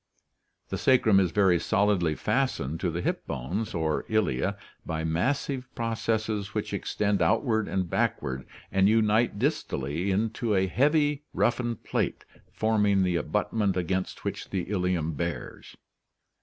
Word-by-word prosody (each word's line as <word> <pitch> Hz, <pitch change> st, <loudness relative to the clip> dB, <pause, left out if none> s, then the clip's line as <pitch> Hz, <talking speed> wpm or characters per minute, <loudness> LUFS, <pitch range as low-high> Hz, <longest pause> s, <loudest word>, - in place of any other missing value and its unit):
The -, -, -3 dB
sacrum 115 Hz, -6 st, +5 dB
is 95 Hz, -2 st, +2 dB
very 95 Hz, -1 st, +3 dB
solidly 95 Hz, -5 st, +2 dB
fastened 80 Hz, -, -1 dB
to 90 Hz, -, 0 dB
the 85 Hz, +1 st, -3 dB
hip -, -, -2 dB
bones 90 Hz, -, -3 dB
or 80 Hz, -2 st, 0 dB
ilia 100 Hz, -, +1 dB, 0.3 s
by 80 Hz, -1 st, -3 dB
massive 130 Hz, -, -1 dB
processes 110 Hz, -3 st, -2 dB
which -, -, -2 dB
extend 100 Hz, -2 st, 0 dB
outward 110 Hz, -, +2 dB
and 95 Hz, -2 st, -1 dB
backward 65 Hz, -5 st, -1 dB, 0.2 s
and 95 Hz, +1 st, +4 dB
unite 110 Hz, 0 st, +3 dB
distally 90 Hz, -, -1 dB
into 110 Hz, +3 st, 0 dB
a 95 Hz, 0 st, +3 dB
heavy 145 Hz, -, +2 dB
roughened 120 Hz, -2 st, 0 dB
plate -, -, -2 dB, 0.3 s
forming 105 Hz, -3 st, +2 dB
the 90 Hz, -1 st, +1 dB
abutment 100 Hz, +3 st, 0 dB
against 95 Hz, +1 st, -2 dB
which -, -, -4 dB
the 95 Hz, 0 st, -3 dB
ilium 90 Hz, -5 st, 0 dB
bears. 85 Hz, +1 st, -5 dB
100 Hz, 130 wpm, -27 LUFS, 85-110 Hz, 0.3 s, sacrum